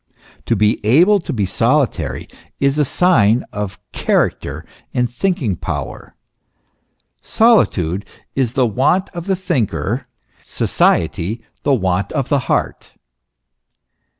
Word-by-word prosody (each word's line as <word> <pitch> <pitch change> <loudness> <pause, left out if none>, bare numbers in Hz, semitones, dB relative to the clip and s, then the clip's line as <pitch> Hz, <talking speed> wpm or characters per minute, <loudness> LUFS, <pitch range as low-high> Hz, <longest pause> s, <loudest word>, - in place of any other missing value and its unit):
To 115 - +2
be 105 +1 +1
able 170 - +5
to 165 - -6
be 105 -5 0
solitary 95 - 0 0.3
is 140 +2 +2
a 150 - +3
sign 125 - +3
of 105 -2 -4
character - - -1 0.3
and 125 0 +2
thinking 125 - -1
power. - - -6 1.1
Solitude 100 - +2 0.3
is 125 -4 0
the 130 -1 +2
want 135 - +1
of 170 0 -7
the 190 - +2
thinker, 125 - -2 0.4
society 110 +7 0 0.2
the 140 -1 +2
want 95 -3 -1
of 140 -5 -2
the 145 - +3
heart. - - -2
125 Hz, 115 wpm, -18 LUFS, 105-150 Hz, 1.1 s, able